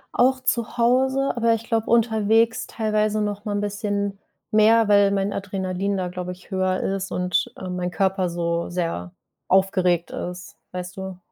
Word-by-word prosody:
Auch 260 +1 +3
zu 235 -1 -1
Hause, 265 +3 +2
aber 230 -1 +3
ich 225 - -6
glaube 225 -1 -1
unterwegs 225 0 +3
teilweise 215 -1 0
noch 205 0 -3
mal 210 - -2
'n 205 - -1
bisschen 205 -1 -2 0.3
mehr, 220 +1 +5
weil 205 -1 +5
mein 200 0 0
Adrenalin 195 0 -2
da, 185 -1 -1
glaube 180 0 -5
ich, 180 +3 -18
höher 185 -1 0
ist 195 0 -2
und, 180 0 0
äh, 185 - -6
mein 180 0 -2
Körper 190 0 0
so 170 0 -2
sehr 165 - -3 0.4
aufgeregt 185 -2 +2
ist, 180 0 -6 0.2
weißt 180 0 -6
du? 190 -1 -6
200 Hz, 165 wpm, -23 LUFS, 180-220 Hz, 0.4 s, mehr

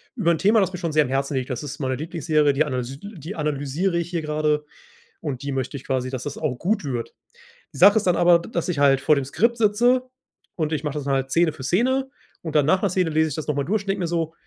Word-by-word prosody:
über 185 -8 +2
'n 165 - 0
Thema, 215 +3 +4
das 190 -1 0
mir 180 - -5
schon 170 -3 -2
sehr 155 0 +4
am 135 - -5
Herzen 135 +1 -1
liegt. 130 +1 -2
Das 125 - -3
ist 145 0 -7
meine 130 -2 -1
Lieblingsserie, 155 -1 +1
die 150 +3 +2
analys 130 -1 -4
die 200 -3 -8
analysiere 150 +4 -1
ich 170 0 -2
hier 170 -2 -2
gerade. 150 -1 0 0.6
Und 140 -5 -4
die 140 - -3
möchte 135 +1 -3
ich 130 - -12
quasi 130 -1 -1
dass 130 -1 -5
das 145 - -5
auch 150 -5 -2
gut 200 - -1
wird. 125 -5 -4 0.6
Die - - -10
Sache 200 +7 +7
ist 210 - +1
dann 180 - +4
aber, 175 -1 +5
d 170 - -10
dass 170 -2 -2
ich 170 - -1
halt 135 -2 +4
vor 150 +3 +4
dem 140 -2 -1
Skript 230 - +1
sitze 240 +4 +2 0.5
und 155 -2 -2
ich 150 -1 -2
mache 150 -1 -3
das 140 - -7
halt 135 -1 0
Szene 170 +1 +3
für 130 - -10
Szene. 260 - +1 0.3
Und 160 -2 -6
dann 150 -2 +4
nach 185 +5 +3
'ner 200 - +1
Szene 180 -3 0
lese 160 +1 +2
ich 145 - -5
das 155 - -5
noch 150 - 0
mal 140 -1 -1
durch 205 +2 0
und 200 - -9
denke 195 - 0
mir 175 - 0
so: 165 -1 -2
155 Hz, 280 wpm, -23 LUFS, 140-180 Hz, 0.6 s, Sache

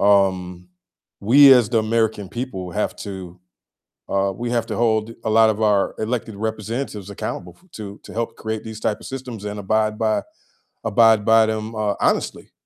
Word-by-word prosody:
um, 95 -3 +2 0.5
we 135 +6 +8
as 125 -5 +5
the 115 -2 +2
American 110 -3 0
people 95 -8 -5
have 105 - -2
to, 95 -3 -8 0.7
uh, 100 0 +1
we 120 0 -2
have 115 -2 0
to - - -3
hold 115 -1 +1
a - - -1
lot 110 0 +6
of 110 -1 -1
our 105 -2 +2
elected 110 -1 -3
representatives 110 0 -4
accountable 90 -3 -5
f - - -27
to 100 -2 -8
to - - -11
help 115 +1 -3
create 110 0 -4
these 110 -1 -8
type 105 - 0
of - - -10
systems 125 -5 -7
and 105 0 -4
abide 110 +2 0
by 110 -1 +1 0.6
abide 115 -3 +4
by 110 0 +5
them, 110 +1 -3
uh, 105 -2 0
honestly. - - -1
110 Hz, 175 wpm, -21 LUFS, 100-115 Hz, 0.7 s, we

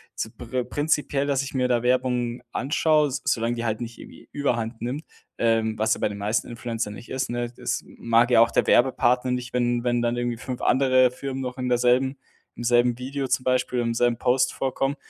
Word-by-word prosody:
zu 110 - -4
pri 120 +2 -4
prinzipiell, 145 0 0
dass 140 -1 +1
ich 135 - -7
mir 125 -1 +1
da 120 -1 +1
Werbung 125 -1 0
anschaue, 150 +1 +2
s 130 0 -4
solange 115 +1 0
die 120 0 -4
halt 110 +1 -2
nicht 115 0 -6
irgendwie - - -13
Überhand 120 -5 -2
nimmt, 130 +7 -3 0.3
ähm, 110 -1 +1
was 110 +1 +2
ja - - -10
bei - - +1
den 100 - -6
meisten 105 +3 -1
Influencern 115 -2 -4
nicht 120 - -11
ist, 130 -1 -2
ne? 120 0 -3
Es - - -2
m - - -18
mag 115 +1 +3
ja 115 - +6
auch 115 0 +4
der - - +1
Werbepartner 125 0 +3
nicht, 125 -1 -3
wenn 120 -1 +1
wenn 120 -1 +1
dann 120 0 0
irgendwie 120 -1 -2
5 125 +1 -6
andere 130 -1 +4
Firmen 135 +1 -5
noch 125 0 -5
in 125 0 -3
derselben 125 +2 +2 0.4
im 120 - -6
selben 120 0 +3
Video 135 +1 -3
zum 125 0 0
Beispiel, 125 -1 0
im 115 0 -1
selben 120 0 +1
Post 125 +1 +2
vorkommen. 135 +1 -1
125 Hz, 215 wpm, -24 LUFS, 120-130 Hz, 0.4 s, ja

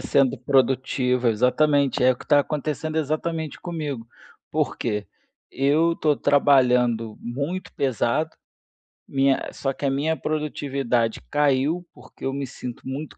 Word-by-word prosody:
sendo 135 -2 +2
produtiva, 130 -1 +2
exatamente, 140 +4 +2
é 130 0 +6
o - - -8
que - - -12
está 145 -1 +5
acontecendo 155 +1 -3
exatamente 155 +1 -2
comigo, 150 -9 -4 0.4
porque 105 0 -1 0.4
eu 155 +5 +2
tô 150 -3 +1
trabalhando 125 -6 +3
muito 140 +10 -4
pesado, 135 +3 0 0.8
minha 135 0 +1
só 135 -1 -2
que 145 - -5
a 135 - +2
minha 150 +4 0
produtividade 140 -6 -1
caiu, 145 +4 +1
porque 125 +1 -12
eu 135 - -1
me 140 -1 -3
sinto 125 -1 -8
muito 140 +3 -6
140 Hz, 130 wpm, -24 LUFS, 125-150 Hz, 0.8 s, é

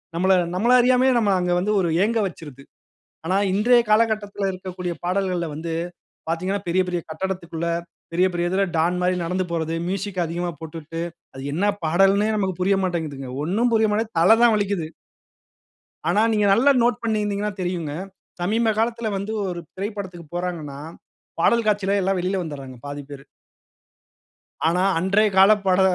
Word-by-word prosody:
நம்மள 185 +3 +3 0.2
நம்மள 235 +7 +3
அறியாமலே 255 +1 +4
நம்மள 205 -3 +2
அங்க 180 0 +1
வந்து 205 +4 0
ஒரு 175 - 0 0.2
ஏங்க 230 +1 0
வச்சுருது. 145 -6 -11 0.6
ஆனா, 185 - +2 0.2
இன்றய 240 +5 +5
காலகட்டத்துல 210 -3 +1
இருக்கக்கூடிய 180 -1 -5
பாடல்கள்ல 180 -2 0
வந்து, 165 +2 -4 0.6
பாத்தீங்கன்னா 185 +4 -1
பெரிய 185 +2 +3
பெரிய 175 -1 -1
கட்டிடத்துக்குள்ள, 170 -2 -4 0.4
பெரிய 180 +2 +3
பெரிய 175 0 -1
இதுல 195 +2 +2
டான் 170 +3 +1
மாரி 180 +1 +2
நடந்து 185 +2 -1
போறது, 165 0 -1
மியூசிக் 195 -1 -2
அதிகமா 175 +2 -3
போட்டுட்டு 160 0 -7 0.3
அது 135 - -8
என்ன 180 +6 0 0.2
பாடல்னே 195 +6 +3
நமக்கு 190 -3 -1
புரிய 195 +2 +3
மாட்டேங்குதுங்க. 155 -7 -3
ஒண்ணும் 225 +9 +1
புரிய 220 -1 +3
மாட்டுது, 220 +1 -1
தல 205 +7 +6
தான் 235 -2 +6
வலிக்குது. 200 -6 -1 1.2
ஆனா, 210 - +3
நீங்க 210 -1 +2
நல்லா 260 +7 +5
நோட் 240 +1 +1
பண்ணியிருந்தீங்கன்னா 210 -2 -1
தெரியுங்க. 175 -5 -3 0.5
சமீப 220 +5 +2
காலத்துல 230 0 0
வந்து 200 +3 -4 0.2
ஒரு 175 -2 -4
திரைப்படத்துக்கு 190 -4 -6
போறாங்கன்னா, 165 -6 -4 0.6
பாடல் 235 +6 +3
காட்சில 200 -1 +2
எல்லாம் 190 0 0
வெளியில 185 +1 -1
வந்துடுறாங்க, 135 -5 -8
பாதி 145 0 -5
பேரு. 140 -1 -9 1.4
ஆனா, 175 +2 +2 0.2
அன்றய 200 +4 +3
கால 195 +2 +8
பட 190 0 +3
185 Hz, 150 wpm, -23 LUFS, 170-210 Hz, 1.4 s, கால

